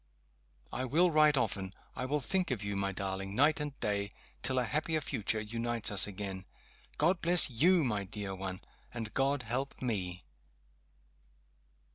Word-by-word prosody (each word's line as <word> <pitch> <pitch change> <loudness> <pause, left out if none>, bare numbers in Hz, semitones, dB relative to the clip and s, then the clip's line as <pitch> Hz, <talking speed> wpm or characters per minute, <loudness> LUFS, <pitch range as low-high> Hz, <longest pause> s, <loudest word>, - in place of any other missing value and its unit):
I 130 - -2
will 165 +7 +3
write 150 -2 +5
often 95 -6 -1 0.2
I 130 - -3
will 145 +2 -1
think 185 +6 0
of 120 -6 -2
you, 100 0 -3
my 100 0 -1
darling, 95 0 -4
night 150 +5 +4
and 145 -2 -5
day, 100 -1 -1 0.3
till 130 - 0
a 125 - +3
happier 155 +5 0
future 110 -6 -1
unites 115 +1 +1
us 100 -1 +5
again. 95 -1 -5 0.5
God 170 +4 +2
bless 175 -4 +5
you, 170 +8 +4
my 105 -6 -1
dear 100 0 -5
one! 95 -1 -5 0.3
And 115 -3 -6
God 135 0 +1
help 125 +5 -2
_me! 90 -8 -3
120 Hz, 155 wpm, -32 LUFS, 100-145 Hz, 0.5 s, write